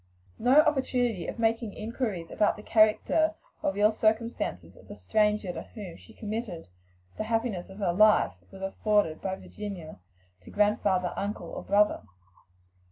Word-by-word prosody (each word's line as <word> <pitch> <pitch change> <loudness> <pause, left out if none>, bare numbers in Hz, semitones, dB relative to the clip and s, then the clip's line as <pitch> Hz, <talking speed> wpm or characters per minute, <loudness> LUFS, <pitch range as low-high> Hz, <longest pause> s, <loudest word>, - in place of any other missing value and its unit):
No 260 +5 +6
opportunity 250 - 0
of - - -5
making 225 -2 0
inquiries 215 -6 -4
about 210 - +2
the 210 - -10
character 225 +10 +3 0.3
or - - +1
real 205 +2 +3
circumstances 220 +2 -1
of - - -17
the - - -9
stranger 210 -3 +1
to - - -5
whom 205 -6 -9
she 90 -1 -15
committed 210 - -5 0.5
the 215 - -2
happiness 225 -5 -1
of 190 - -11
her 190 -5 0
life, 215 +3 +5 0.2
was 195 -1 -10
afforded 195 -4 +1
by 190 -1 -2
Virginia 190 - -8 0.4
to - - -14
grandfather, 200 -3 +1
uncle 205 +1 -4
or - - -6
brothers. 205 - +2
210 Hz, 150 wpm, -28 LUFS, 195-225 Hz, 0.5 s, No